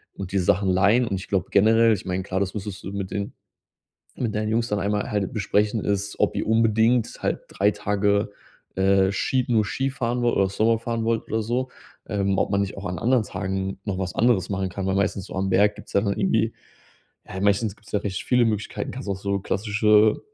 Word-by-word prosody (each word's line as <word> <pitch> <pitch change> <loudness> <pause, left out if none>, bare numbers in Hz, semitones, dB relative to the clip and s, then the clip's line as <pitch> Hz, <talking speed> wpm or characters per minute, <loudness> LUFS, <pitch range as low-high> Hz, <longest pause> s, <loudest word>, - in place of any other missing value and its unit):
und 95 -1 -6
die 100 - +1
Sachen 95 +2 +2
leihen. 100 +7 +4
Und 100 - -1
ich 95 - -8
glaube 95 -2 -1
generell 115 +2 +5
ich 95 - -4
meine, 95 0 -2
klar, 95 0 -2
das 95 -1 -1
müsstest 100 -1 -6
du 95 - -6
mit 100 -1 -4
den 100 0 -3 0.8
mit 115 -4 -2
deinen 105 0 -1
Jungs 115 +1 0
dann 105 - 0
einmal 105 +1 -1
halt 105 -3 -1
besprechen 105 0 0
ist, 100 0 -2
ob - - +1
ihr - - -2
unbedingt 115 +1 +2
halt - - 0
3 100 +2 +2
Tage, 105 0 0 0.4
äh, 95 0 +3
Ski 125 +6 0
nur 110 -3 +3
Skifahren 125 +1 -2
wollt 120 -1 +1
oder 95 -1 +2
Snowboard 110 +3 +1
fahren 115 -1 -2
wollt, 115 0 0
oder 110 - 0
so, 125 +4 -2 0.4
ähm, 100 -2 0
ob - - +1
man 100 0 +1
nicht 100 -1 -2
auch 100 - -8
an 90 -1 -3
anderen 125 +4 +2
Tagen 95 -1 -3
noch 100 - -2
was 95 -2 -3
anderes 110 -6 +2
machen 95 -1 -1
kann. 95 +2 -5
Weil 95 - 0
meistens 100 -1 0
so - - -10
am 95 +1 -1
Berg 105 +2 +3
gibt's 105 - -13
ja 100 - +4
dann 100 -2 0
irgendwie - - +1 0.8
ja, 95 - -6
meistens 100 +1 +1
gibt's 105 - -19
ja 105 - +1
recht 95 -3 -4
viele 125 -1 +3
Möglichkeiten. 105 -2 -2
Du - - -9
kannst 130 -5 -6
auch 100 - -1
so 100 0 -1
klassische 105 +2 +3
105 Hz, 220 wpm, -24 LUFS, 95-110 Hz, 0.8 s, generell